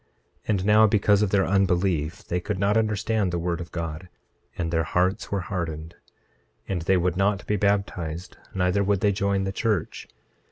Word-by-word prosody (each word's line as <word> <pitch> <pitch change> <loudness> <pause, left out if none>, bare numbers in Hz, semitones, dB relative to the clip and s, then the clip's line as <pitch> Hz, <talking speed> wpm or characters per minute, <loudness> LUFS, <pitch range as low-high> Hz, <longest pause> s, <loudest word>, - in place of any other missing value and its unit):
26:3 - - -17
And 100 -3 +1
now 105 +1 +6
because 105 0 +3
of 105 - +2
their 95 -1 +2
unbelief 90 -4 +1
they 90 - -1
could 100 +2 -3
not 100 +2 +1
understand 110 -2 +1
the 85 - -1
word 85 0 -2
of 85 - -8
God; 85 +1 -5 0.5
and 85 -2 -2
their 80 -1 +2
hearts 90 +4 0
were 100 -1 0
hardened. 85 -3 -4 0.7
26:4 - - -5
And 90 -3 -1
they 95 +3 +2
would 90 0 0
not 100 0 +1
be 105 - 0
baptized; 95 -4 -1 0.2
neither 90 +2 +1
would 100 -1 +1
they 105 - +3
join 100 0 0
the 95 - -2
church. 105 -3 -2
95 Hz, 190 wpm, -25 LUFS, 85-100 Hz, 0.7 s, now